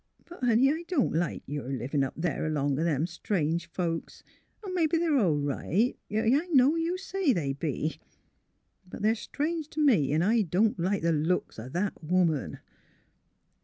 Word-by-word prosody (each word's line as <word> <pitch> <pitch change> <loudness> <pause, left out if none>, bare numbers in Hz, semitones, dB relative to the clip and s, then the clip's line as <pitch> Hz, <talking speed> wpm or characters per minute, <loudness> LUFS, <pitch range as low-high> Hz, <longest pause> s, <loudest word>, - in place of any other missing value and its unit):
But, 345 -6 -12
honey, 245 +3 +4
I 325 +2 -5
don't 340 -9 +1
like 170 +2 -1
your 145 -2 -5
livin' 135 +2 -1
up 135 - -4
there 160 -3 -1
along 145 -2 0
o' - - +1
them 155 -2 +1
strange 170 -1 -2
folks. 165 -1 -4 0.4
Mebbe 345 -4 0
they're 325 -4 +3
all 170 -9 +2
right. 145 - 0
— - - -49
Yes, 225 +7 +2
I 350 - -12
know 285 -2 +4
you 330 +2 -1
say 385 -6 0
they 145 -8 -1
be. 150 +2 -3 0.9
But 200 - -8
they're 220 +1 +4
strange 305 +7 -3
t' 310 - -6
me, 220 - +4
'n' 155 +3 +2
I 225 +4 +3
don't 200 +2 +1
like 185 +2 0
the 170 - +3
looks 160 -3 -1
o' 115 +4 -7
that 180 +4 -3
woman." 165 -3 +1
180 Hz, 175 wpm, -28 LUFS, -, 0.9 s, honey